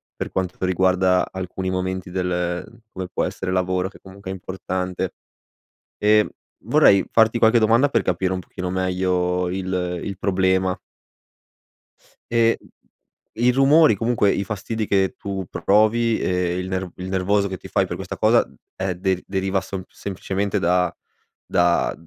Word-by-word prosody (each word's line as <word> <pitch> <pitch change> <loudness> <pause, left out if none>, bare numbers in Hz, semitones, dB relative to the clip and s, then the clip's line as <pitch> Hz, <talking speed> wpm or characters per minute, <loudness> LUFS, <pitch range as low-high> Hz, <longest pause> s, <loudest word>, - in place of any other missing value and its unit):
per - - -5
quanto 95 0 -3
riguarda 95 0 +2
alcuni 95 0 -4
momenti 95 0 -3
del 90 +4 -3
come 95 -1 -5
può - - -2
essere 90 - -3
lavoro, 95 0 0
che - - -17
comunque 95 0 -11
è - - -2
importante 95 0 -4 0.9
ehm, 105 0 +4 0.4
vorrei 100 -1 +5
farti 115 +1 +4
qualche 115 +1 +5
domanda 115 +6 +4
per - - +1
capire 90 +1 0
un 95 - -2
pochino 90 0 -6
meglio 90 -1 0
il 90 -1 -2
il 100 -2 -5
problema. 95 -1 +1 1.6
Ehm, 115 -1 +3 0.8
i 120 +2 +3
rumori, 135 0 +5
comunque, 115 -1 +2
i 100 - -1
fastidi 110 +1 -3
che 95 -1 +1
tu 95 -2 -4
provi 110 +3 +2
e 90 -1 0
il 90 0 -4
ner 95 0 -2
il 90 0 -6
nervoso 100 +2 +1
che 95 - -4
ti - - -12
fai - - +2
per - - -5
questa - - -6
cosa - - +3 0.3
è 95 -1 -2
de 95 0 -1
deriva 95 0 -1
sem 95 0 -6
semplicemente 100 +1 -3
da 90 0 +2 0.5
da, 85 0 +2
95 Hz, 145 wpm, -22 LUFS, 90-100 Hz, 1.6 s, vorrei